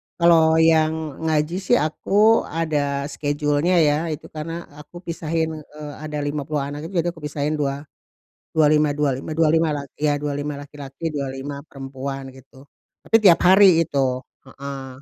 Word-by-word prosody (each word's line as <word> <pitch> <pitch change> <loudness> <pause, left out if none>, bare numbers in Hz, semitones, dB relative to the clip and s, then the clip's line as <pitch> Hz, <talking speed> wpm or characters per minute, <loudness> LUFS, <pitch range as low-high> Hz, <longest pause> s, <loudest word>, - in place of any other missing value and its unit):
Kalau 165 -2 +5
yang 160 -2 +2
ngaji 155 +3 0
sih 190 - +2
aku 205 +8 +2
ada 145 -4 -1
schedule-nya 145 +4 0
ya 145 -1 +3
itu 155 -1 -6
karena 165 +2 -6 0.2
aku 175 +4 -12
pisahin, 160 -1 -2
eee, 150 0 -10
ada 150 -1 -4
50 145 0 -2
anak 145 +3 -6
itu 190 - -11
jadi 175 - -1
aku 170 - -15
pisahin 150 +1 -2
dua 140 0 -2 0.7
dua 155 -1 +4
lima 150 -1 +2
dua 150 -2 +1
lima 155 +3 -6
dua 160 -2 +3
lima 160 -2 +2
la 145 - -4 0.2
iya 150 -1 +2
25 145 0 -3
laki-laki 145 +2 -7
25 140 0 -5
perempuan 135 -1 -7
gitu 130 0 -17 0.4
tapi 225 - +4
tiap 185 -6 +6
hari 185 -2 +7
itu, 145 -3 -3 0.5
heeh. 135 -1 -8
150 Hz, 155 wpm, -22 LUFS, 145-160 Hz, 0.7 s, hari